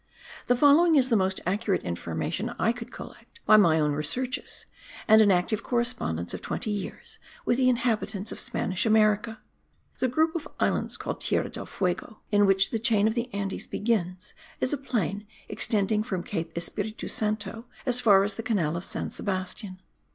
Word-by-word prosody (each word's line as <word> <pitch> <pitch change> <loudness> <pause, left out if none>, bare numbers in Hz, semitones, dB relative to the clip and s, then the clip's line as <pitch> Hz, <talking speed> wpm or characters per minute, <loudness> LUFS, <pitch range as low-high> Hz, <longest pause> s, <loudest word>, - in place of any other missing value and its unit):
The 245 - +4
following 305 +5 +6
is 260 -3 +4
the 230 - +3
most 190 -2 0
accurate 195 +1 0
information 90 - -3
I 225 - +2
could 240 0 -8
collect 465 - -12
by 215 - +7
my 170 -7 +5
own 150 -1 +2
researches 195 - -3 0.4
and 220 0 +7
an 210 - +5
active 195 +4 +1
correspondence 235 - -1
of - - -5
twenty 215 - -3
years 205 -1 -6 0.3
with 240 - +2
the 255 -1 +4
inhabitants 225 -4 -1
of - - -7
Spanish 185 -1 -1
America. 215 0 +2 0.6
The 255 - +2
group 315 +6 +1
of 325 - -3
islands - - 0
called - - -5
Tierra - - 0
del - - -7
Fuego, 190 +4 -3
in 205 -1 +4
which 195 0 +3
the 225 - -1
chain 215 -2 +3
of 220 - +1
the 240 +1 -3
Andes 200 -2 -4
begins, 200 -3 -2 0.3
is 255 - +1
a - - +1
plain 210 - -2 0.2
extending 210 0 0
from 190 -6 -3
Cape 165 -4 -4
Espiritu 215 +6 -3
Santo 215 0 -2 0.2
as 250 -1 +3
far 200 -4 +6
as 200 +1 0
the 225 - -5
canal 195 -9 0
of 170 - -4
San - - -3
Sebastian. 185 0 -3
215 Hz, 175 wpm, -27 LUFS, 190-235 Hz, 0.6 s, by